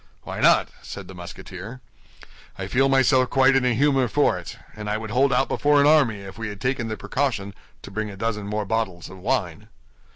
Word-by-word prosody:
"Why -, -, -6 dB
not?" -, -, +4 dB
said 90 Hz, +10 st, -8 dB
the 95 Hz, -, -10 dB
Musketeer. 90 Hz, +5 st, -9 dB, 0.8 s
"I -, -, -4 dB
feel 135 Hz, +2 st, +2 dB
myself 130 Hz, -1 st, +4 dB
quite 135 Hz, 0 st, +4 dB
in 135 Hz, -, +3 dB
a 125 Hz, -2 st, +2 dB
humor 135 Hz, 0 st, +3 dB
for 145 Hz, -4 st, +2 dB
it; 85 Hz, -, -9 dB, 0.2 s
and 105 Hz, -1 st, -6 dB
I 105 Hz, -, 0 dB
would 110 Hz, -1 st, -6 dB
hold 135 Hz, +4 st, +3 dB
out 135 Hz, -, +2 dB
before 145 Hz, 0 st, +2 dB
an 140 Hz, -, +5 dB
army 140 Hz, -9 st, +4 dB
if 95 Hz, +2 st, -10 dB
we 115 Hz, -, -3 dB
had 100 Hz, -1 st, -7 dB
taken 125 Hz, -2 st, -1 dB
the 110 Hz, -1 st, -4 dB
precaution 110 Hz, -8 st, -2 dB, 0.3 s
to 100 Hz, -, -9 dB
bring 110 Hz, +2 st, -3 dB
a 100 Hz, -, -9 dB
dozen 105 Hz, -1 st, -2 dB
more 105 Hz, 0 st, -2 dB
bottles 95 Hz, -5 st, -2 dB
of 95 Hz, -, -11 dB
wine." -, -, -2 dB
115 Hz, 215 wpm, -24 LUFS, 100-135 Hz, 0.8 s, an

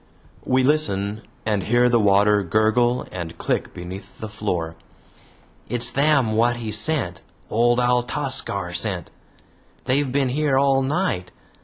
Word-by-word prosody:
We 130 Hz, 0 st, +2 dB
listen, 110 Hz, -8 st, +1 dB, 0.2 s
and 105 Hz, -2 st, 0 dB
hear 120 Hz, +5 st, +2 dB
the 120 Hz, -1 st, +3 dB
water 105 Hz, 0 st, +4 dB
gurgle 110 Hz, +6 st, +1 dB
and 85 Hz, -2 st, -6 dB
click -, -, -2 dB
beneath 95 Hz, +3 st, -9 dB
the 110 Hz, -, -7 dB
floor. 90 Hz, -6 st, -3 dB, 0.9 s
"It's 120 Hz, 0 st, 0 dB
them 140 Hz, -5 st, +2 dB
wot 120 Hz, +2 st, +2 dB
he 115 Hz, -2 st, -5 dB
sent! 105 Hz, -, 0 dB, 0.3 s
Old 120 Hz, +2 st, +3 dB
Altascar 125 Hz, -6 st, 0 dB
sent. 90 Hz, -3 st, -1 dB, 0.7 s
They've 135 Hz, +1 st, +1 dB
been 135 Hz, -1 st, +1 dB
here 140 Hz, 0 st, +1 dB
all 135 Hz, 0 st, +3 dB
night. 135 Hz, -, -1 dB
115 Hz, 130 wpm, -22 LUFS, 100-130 Hz, 0.9 s, water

